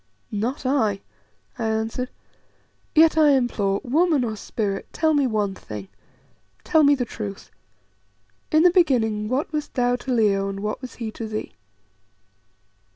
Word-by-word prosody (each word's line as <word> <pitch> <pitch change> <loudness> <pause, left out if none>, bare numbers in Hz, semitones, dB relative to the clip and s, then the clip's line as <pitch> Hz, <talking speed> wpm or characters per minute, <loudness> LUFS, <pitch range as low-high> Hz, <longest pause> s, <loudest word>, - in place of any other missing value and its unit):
"Not 235 +7 -2
I," 220 -7 +1 0.6
I 230 - -1
answered. 220 +3 -2 0.9
"Yet 320 0 +6
I 300 -2 +6
implore, 210 -7 +1
woman 305 +1 +2
or 220 -2 -2
spirit, 200 -1 -3
tell 315 0 +1
me 285 -3 +3
one 210 -4 0
thing. 105 - -9 0.7
Tell 320 -2 +3
me 285 0 +6
the 250 -3 -2
truth. 205 -4 -7 1.0
In 310 0 +5
the 360 - +6
beginning 225 - +2
what 275 +5 -1
wast 300 -1 -4
thou 245 -1 +2
to 255 +1 -5
Leo, 200 -4 +2
and 195 0 -5
what 210 +4 -3
was 255 -2 -8
he 225 -2 -5
to 225 0 -6
thee?" 215 0 -5
240 Hz, 150 wpm, -23 LUFS, 210-285 Hz, 1.0 s, Yet